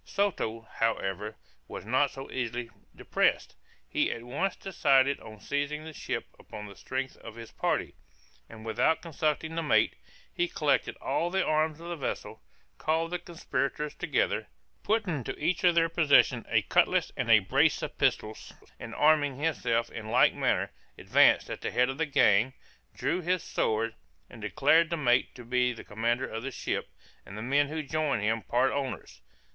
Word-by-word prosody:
Soto, 185 - -1
however, 105 -3 -2 0.3
was - - -8
not 130 +5 +2
so 135 0 -9
easily 120 -1 -3 0.2
depressed. - - 0 0.3
He - - +1
at 115 - -6
once 140 +11 -2
decided 140 -7 +2
on 110 -1 -12
seizing 145 +6 -2
the 160 0 -9
ship - - -4
upon 105 - -9
the 100 -1 -11
strength 130 +4 -4
of 115 -1 -11
his 115 -1 -10
party: - - -1 0.6
and 110 0 -11
without 115 +9 +1
consulting 160 -1 -1
the 165 - -1
mate, 155 - +3 0.4
he 350 - 0
collected - - 0
all 170 - -1
the 190 +1 +1
arms 155 0 +1
of 170 - -9
the 175 - -3
vessel, 140 -6 -5 0.4
called 165 +2 0
the 180 - -2
conspirators 150 -4 -3
together, - - -1 0.3
put 220 0 +1
into 150 - -3
each 170 +3 0
of 175 -2 +5
their 165 -1 +4
possession 165 -3 +3
a - - +3
cutlass - - +2
and - - -2
a - - +9
brace - - +2
of - - -6
pistols, 110 0 -1 0.3
and - - -8
arming 150 -3 +3
himself 125 -6 0
in 110 -1 -7
like - - +5
manner, - - 0 0.3
advanced - - +4
at - - -6
the - - -2
head 125 +1 +2
of 135 +3 -5
the 160 - +1
gang, 115 -2 +4 0.4
drew 180 - -1
his 180 0 0
sword, 110 +1 0 0.4
and 115 - -11
declared 150 +9 +3
the 170 - -1
mate 125 -5 +2
to 120 - -11
be 125 +1 +2
the 120 - -9
commander 115 +4 -1
of 110 -2 -5
the 135 - -4
ship, 130 - -3 0.3
and 95 - -10
the 110 - -5
men 140 +4 +2
who 155 +1 -4
joined 150 -6 -1
him 110 +1 +1
part 125 +4 +1
owners. 135 - -4
140 Hz, 175 wpm, -29 LUFS, 115-160 Hz, 0.6 s, a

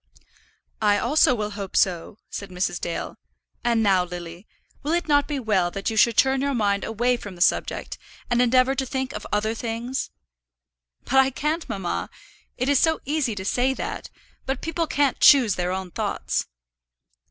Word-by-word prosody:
"I 205 -1 +4
also 290 +3 +3
will 210 -2 -3
hope 200 -2 -7
so," 185 +1 +1
said 200 - -6
Mrs. 180 -1 -2
Dale. 170 - -4 0.4
"And 235 -2 +2
now, 190 -3 +4
Lily, 175 +2 -8 0.3
will 300 +3 -1
it 345 0 0
not 290 -1 +3
be 290 -2 -2
well 200 -7 +1
that 195 +4 -3
you - - -4
should 230 0 +4
turn 265 0 +3
your 280 -1 0
mind 200 -3 +1
away 240 +3 0
from 205 -5 -9
the - - -14
subject, - - 0 0.3
and 240 0 +2
endeavour 255 +2 +4
to 270 0 -2
think 265 +1 -3
of - - -6
other 215 +2 0
things?" 235 +3 -4 0.9
"But 265 - 0
I 265 0 +5
can't, 305 +5 -2
mamma. 190 -3 -3 0.5
It 255 - -1
is 285 -2 +4
so 320 -1 +2
easy 280 -6 0
to 190 -1 -6
say 255 +6 +1
that; - - -5 0.4
but 265 0 -2
people 330 0 -1
can't 285 -3 +1
choose 255 -8 +7
their 180 -1 -2
own 185 -1 -4
thoughts." - - -2
235 Hz, 175 wpm, -24 LUFS, 200-270 Hz, 0.9 s, choose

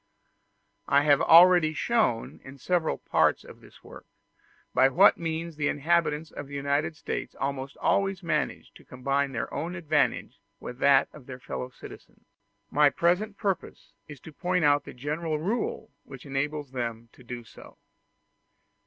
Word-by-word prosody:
I 140 +1 +4
have 145 0 +4
already 170 -2 +6
shown, 215 - 0
in 135 +1 -12
several 170 +3 0
parts - - +1
of - - -14
this - - -18
work, - - -13 0.7
by 130 - +5
what 185 +9 +5
means 165 0 -4
the 145 -1 0
inhabitants 160 0 0
of 145 - -8
the 140 - -9
United 140 +3 -1
States - - -5
almost 135 0 -4
always 195 -1 0
manage 155 -3 -2
to - - -17
combine 135 +2 -2
their 115 -3 -4
own 165 +5 -4
advantage 155 -4 -1 0.2
with 125 +1 -9
that 140 -1 +4
of 145 -5 -14
their 130 -2 -8
fellow 125 0 -6
citizens: - - -14 0.5
my 150 0 +5
present 180 +7 0
purpose 195 -4 -4
is 145 -3 -11
to 160 - -12
point 180 +1 0
out 145 0 +3
the - - -9
general 150 +4 -3
rule 195 +1 -3
which 135 -1 -12
enables 145 0 -3
them 115 -2 -5
to - - -18
do 120 0 -7
so. 110 - -15
150 Hz, 155 wpm, -27 LUFS, 135-170 Hz, 0.7 s, already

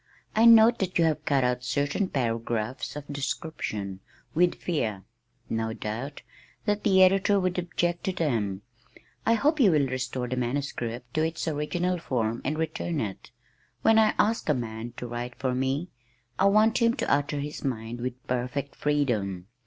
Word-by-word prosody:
I 220 +1 +5
note 230 0 +8
that 185 -2 -1
you 170 - +4
have 155 -1 0
cut 140 -2 +2
out 125 0 0
certain 145 +8 0
paragraphs 115 -1 -2
of 150 -1 -6
description 135 - -4 0.3
with 175 +2 +3
the - - -18
fear, 110 - -2 0.4
no 110 0 -2
doubt, 120 +7 -5 0.4
that 210 -1 0
the 190 -2 +6
editor 195 +2 +4
would 185 -1 0
object 175 0 -1
to 190 - +1
them. 110 - -1 0.6
I 230 - +5
hope 300 +6 +2
you 230 -7 +6
will 150 -5 +3
restore 130 -1 -3
the 130 - -2
manuscript 125 -2 -3
to 155 - +1
its 160 +1 -2
original 170 +4 -1
form 115 -6 -1
and 155 +2 -1
return 160 0 -2
it. 100 -6 -5 0.5
When 225 0 +6
I 215 -1 +4
ask 220 -5 +1
a 150 - +4
man 115 -1 -5
to - - -5
write 120 0 -5
for 130 -2 -1
me, 135 +7 -1 0.5
I 190 - +4
want 215 +3 +4
him 230 +1 +4
to - - 0
utter 145 +1 0
his 145 +1 -5
mind 120 -3 -3
with 125 0 -5
perfect 125 +3 -2
freedom. 110 -11 0
140 Hz, 170 wpm, -27 LUFS, 120-180 Hz, 0.6 s, note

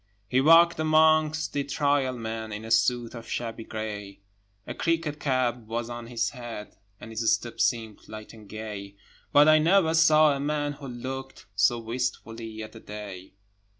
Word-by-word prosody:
He 130 +1 +2
walked 165 +3 +6
amongst 155 0 +3
the 145 - 0
Trial 140 -2 0
Men 110 -1 -5
In 105 +2 -6
a 115 - -7
suit 115 +2 +2
of 115 -1 -9
shabby 115 -1 -4
grey; 105 -2 -6 0.4
A - - -5
cricket 165 -3 -1
cap 130 -4 0
was 115 +1 -3
on 120 -1 -7
his 115 -2 -1
head, 120 -4 -8 0.2
And 115 - -10
his 110 0 +1
step 115 +2 -2
seemed 110 -3 -1
light 110 0 -9
and 110 -3 -14
gay; 105 -2 -7 0.4
But 145 +1 +6
I 155 0 +7
never 165 0 +3
saw 155 -2 +5
a - - -4
man 145 0 -1
who 140 -1 -10
looked 130 +1 -7
So 100 +4 +3
wistfully 115 -2 -4
at 110 - -9
the 115 - -12
day. 100 -4 -9
120 Hz, 170 wpm, -27 LUFS, 110-145 Hz, 0.4 s, I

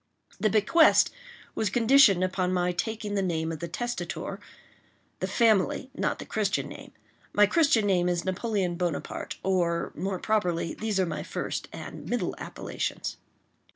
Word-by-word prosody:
The 215 - +2
bequest 220 - +5 0.4
was 215 - 0
conditioned 230 -4 +5
upon 185 0 0
my 180 -1 +1
taking 210 +4 -3
the 200 - +1
name 165 -3 -1
of 160 - -5
the 170 - -4
testator,—the 240 +8 -7
family, 230 +3 +2
not - - -1
the - - -8
Christian - - -1
name; - - -10 0.4
my 205 - +6
Christian 245 -3 +3
name 180 -3 +2
is 175 -1 -1
Napoleon 190 -2 -1
Bonaparte—or, 175 +1 -1
more 190 +3 -3
properly, 180 -6 0
these 215 -3 -2
are 190 - +3
my 155 -3 -4
first - - -4
and - - -8
middle - - -1
appellations. - - -4
190 Hz, 140 wpm, -27 LUFS, 175-220 Hz, 0.4 s, my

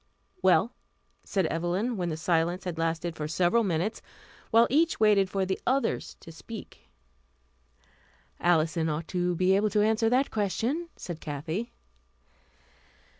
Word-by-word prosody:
"Well?" - - +3 0.5
said 190 -3 0
Evelyn, 175 +9 -1
when 180 -3 -2
the 155 - -3
silence 170 +2 0
had 175 -3 -5
lasted 165 +1 -1
for 150 -1 -4
several 175 +8 +2
minutes 190 +3 -1 0.5
while 230 +1 +6
each 320 +5 +2
waited 205 -3 +4
for 195 0 -1
the 190 0 -3
others 270 +2 0
to 165 - -11
speak. 220 +6 -11 1.5
"Alison 165 -1 +2
ought 155 +1 -3
to 180 -1 0
be 185 +2 +3
able 210 +2 +2
to 210 +1 +2
answer 220 +1 +2
that 255 +3 +2
question," 225 - -1
said 170 -3 -7
Kathy. 160 +9 -4
185 Hz, 135 wpm, -28 LUFS, 165-220 Hz, 1.5 s, while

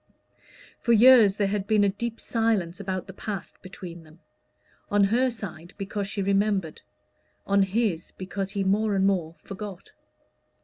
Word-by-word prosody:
For 235 - +2
years 230 -3 +7
there 205 -1 0
had 200 -1 -2
been 215 -2 +3
a 200 - +4
deep 230 +3 -4
silence 215 -7 0
about 190 -2 -3
the 190 - -10
past 200 -1 -6
between 180 -2 -9
them; 160 +1 -18 0.7
on 205 0 +3
her 240 +6 +3
side 190 -7 -8
because 200 0 -3
she 200 0 -2
remembered; 195 -4 0 0.6
on 200 0 +3
his, 195 -3 0
because 190 +1 -5
he 200 -1 -2
more 205 +2 +1
and 190 0 +2
more 175 -5 0
forgot. 200 -2 -8
200 Hz, 150 wpm, -26 LUFS, 190-215 Hz, 0.7 s, years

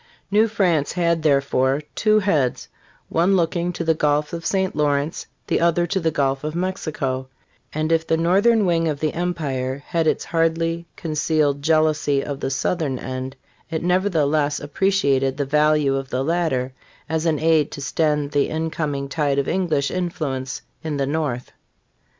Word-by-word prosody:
New 215 +2 +4
France 175 -9 +1
had, 170 -2 +1
therefore, 140 -1 +2
two 215 -1 +3
heads: 155 - +1 0.4
one 175 +4 +2
looking 175 0 0
to 170 - -4
the 160 0 +3
Gulf 150 0 0
of 165 -1 -4
St. 190 -3 0
Lawrence, 145 0 0 0.2
the - - +1
other 170 0 +3
to 180 +3 -1
the 165 -2 +1
Gulf 135 -2 0
of 155 +1 -3
Mexico; 155 -8 -2 0.4
and 155 +1 -1
if 165 0 +2
the 160 - +2
northern 200 +6 +3
wing 165 -2 +2
of 150 -2 -2
the 155 0 -1
empire 140 -6 -2
hnd 165 -2 +1
its - - +1
hardly 165 0 0
concealed 155 -2 0
jealousy 155 -2 +2
of 140 -2 -4
the - - -2
southern 135 0 -1
end, 130 +1 -5 0.3
it 160 -1 -3
nevertheless 155 -6 +1
appreciated 140 -5 +1
the 145 - -1
value 150 -1 +3
of 135 -1 -4
the 130 +1 -1
latter 140 -6 0 0.3
as 160 +1 -1
an 155 -2 +2
aid 160 -1 +3
to - - -8
stem 150 0 0
the 145 -1 +1
incoming 155 -3 -2
tide 140 -1 0
of 140 - 0
English 160 -7 0
influ 170 -6 -2
ence 130 0 -6 0.2
in 155 -2 -2
the 140 - 0
north. 140 -4 -2
155 Hz, 165 wpm, -22 LUFS, 140-170 Hz, 0.4 s, New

